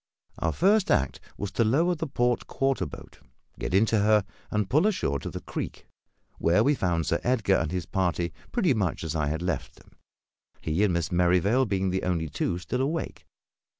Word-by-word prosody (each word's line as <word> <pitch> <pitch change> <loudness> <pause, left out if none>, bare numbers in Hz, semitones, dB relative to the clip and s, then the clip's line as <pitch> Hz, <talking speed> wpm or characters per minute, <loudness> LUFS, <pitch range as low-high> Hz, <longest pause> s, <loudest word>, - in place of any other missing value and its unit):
Our 80 - 0
first 200 - +3
act 65 -1 +1 0.2
was 100 - -4
to 115 - +2
lower 155 +11 +3
the 160 -1 -3
port 120 -3 0
quarter 135 0 0
boat, - - -12 0.4
get - - -3
into 110 +3 +3
her, 105 0 +4 0.2
and 105 -2 0
pull 155 - +3
ashore 70 - 0
to - - -5
the - - -6
creek, - - -6 0.5
where 90 +6 +3
we 145 - +4
found 85 - 0
Sir - - +1
Edgar 110 -6 +2
and 80 - -1
his 90 -3 -2
party 85 -2 -1 0.2
pretty 190 - +2
much 100 -8 -1
as 80 0 -3
I 75 -2 0
had 80 +3 -2
left 90 -7 -3
them; - - -21 0.7
he 80 +6 0
and 105 - +3
Miss 85 -3 -1
Merrivale 90 +8 +3
being 95 -2 0
the 95 +1 -1
only 85 -3 -1
two 85 - -1
still 125 +8 -3
awake. 155 +5 -3
95 Hz, 190 wpm, -27 LUFS, 85-130 Hz, 0.7 s, her